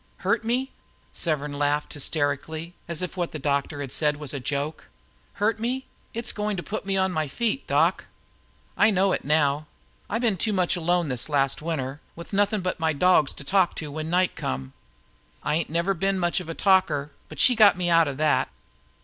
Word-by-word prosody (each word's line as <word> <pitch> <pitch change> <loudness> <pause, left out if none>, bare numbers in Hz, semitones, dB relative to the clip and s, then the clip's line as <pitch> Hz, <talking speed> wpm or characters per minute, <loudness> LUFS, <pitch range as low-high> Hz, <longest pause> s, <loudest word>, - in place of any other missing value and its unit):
"Hurt 205 +5 +2
me!" 250 +4 -1 0.4
Severn 150 -3 -2
laughed 145 +1 0
hysterically, 155 +3 -2
as 170 +1 -2
If 180 - -4
what 175 -2 -2
the - - -3
doctor 145 0 -1
had 135 -3 -5
said 150 0 +2
was 150 -2 -4
a 140 - -3
joke. 145 +4 -3 0.5
"Hurt 215 +1 0
me? 255 +4 -2 0.3
It's 230 +1 -4
what's - - -6
going 210 -1 -1
to 175 - -4
put 215 -2 -5
me 195 0 +1
on 190 0 +2
my 155 -3 -1
feet, 235 - -2
doc. - - +2 0.7
I 210 - +5
know 195 -1 +3
it - - -1
now, 150 0 +2 0.4
I 220 - 0
been 230 -5 +1
too 215 +5 0
much 185 -3 +2
alone 175 -1 +1
this 125 +2 -2
last 140 -2 +1
winter, 145 -4 -3
with 170 +4 -10
nothin' 205 +1 +2
but 185 0 -2
my 160 -1 +1
dogs 155 -2 +4
to - - -9
talk 185 +4 +2
to 150 -2 -5
when 155 +2 -4
night 180 +1 +2
come. 65 0 -4 0.7
I 150 - 0
ain't 160 0 0
never 170 +5 +1
been 195 +2 0
much 175 -1 +1
of 175 -3 -8
a 165 - -4
talker, 170 -7 +2 0.2
but - - -10
she 255 - +6
got 210 -5 +6
me 175 -1 0
out 165 -1 +5
o' 140 - -3
that. 150 +1 +2
165 Hz, 205 wpm, -25 LUFS, 145-195 Hz, 0.7 s, she